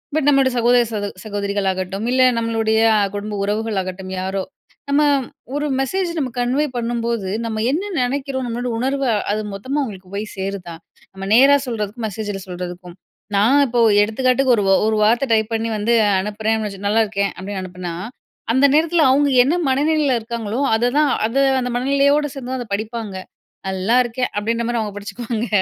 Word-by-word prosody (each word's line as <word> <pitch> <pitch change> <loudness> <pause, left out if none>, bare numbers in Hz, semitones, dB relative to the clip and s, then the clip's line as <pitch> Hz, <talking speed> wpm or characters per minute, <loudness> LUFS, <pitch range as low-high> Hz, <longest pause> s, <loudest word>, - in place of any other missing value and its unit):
But 310 -3 +1
நம்மளோட 275 -2 +4
சகோதர, 240 +1 +4
சகோ 205 -1 -2 0.2
சகோதரிகள் 200 -1 -2
ஆகட்டும், 190 +3 -4
இல்லை 255 0 +4
நம்மளுடைய 225 -1 +1 0.3
குடும்ப 210 +1 -4
உறவுகள் 215 +1 -1
ஆகட்டும், 185 0 -7
யாரோ. 190 +1 -2 0.5
நம்ம 285 +1 +3 0.5
ஒரு 295 - -1
மெசேஜ் 365 +7 -1
நம்ம 265 -3 -1
கன்வே 255 +5 +1
பண்ணும்போது 235 -4 -2 0.2
நம்ம 220 -1 -3
என்ன 375 +8 -2
நெனைக்கிறோம். 265 +1 -2
நம்மளோட 240 +1 -3
உணர்வு 270 +2 -1 0.3
அது, 215 - -1
மொத்தமா 260 +9 -3
அவங்களுக்கு 195 -7 -6
போய் 205 +2 -3
சேருதா? 190 -3 -5 0.4
நம்ம 195 0 -7
நேரா 275 +5 +7
சொல்றதுக்கும் 220 0 -3
மெசேஜில 205 -1 -5
சொல்றதுக்கும். 180 0 -7 0.4
நான் 240 +8 +4
இப்போ 240 0 -1 0.2
எடுத்துக்காட்டுக்கு, 255 +4 +2
ஒரு 205 - 0 0.2
ஒரு 220 - +1
வார்த்தை 235 +5 +3
டைப் 220 0 +2
பண்ணி 225 0 -1
வந்து 220 +3 +1 0.3
அனுப்புறேன் 215 +2 -1
வச்சு 195 -2 -6
'நல்லாயிருக்கேன்' 205 -1 +1
அப்படின்னு 190 +1 -5
அனுப்புனா, 180 -2 -6 0.6
அந்த 260 +4 +4
நேரத்துல, 325 +1 +3
அவங்க 285 +1 +3
என்ன 300 +7 +1
மனநிலையில 285 -1 +2
இருக்காங்களோ, 225 0 -4 0.2
அதை 235 +2 +1
தான் 300 -1 +4 0.2
அதை 265 +5 +1 0.2
அந்த 250 -1 -2
மனநிலையோடு 280 +3 +2
சேர்ந்து 260 -2 -7
தான் 260 - -2
அதை 235 - -7
படிப்பாங்க. 215 -1 -4 0.5
'நல்லாயிருக்கேன்' 235 +6 0
அப்படின்ற 230 +3 -1
மாரி 240 -1 -1
அவங்க 210 -2 -3
படிச்சுக்குவாங்க. 230 +2 -4
230 Hz, 155 wpm, -20 LUFS, 205-260 Hz, 0.6 s, நேரா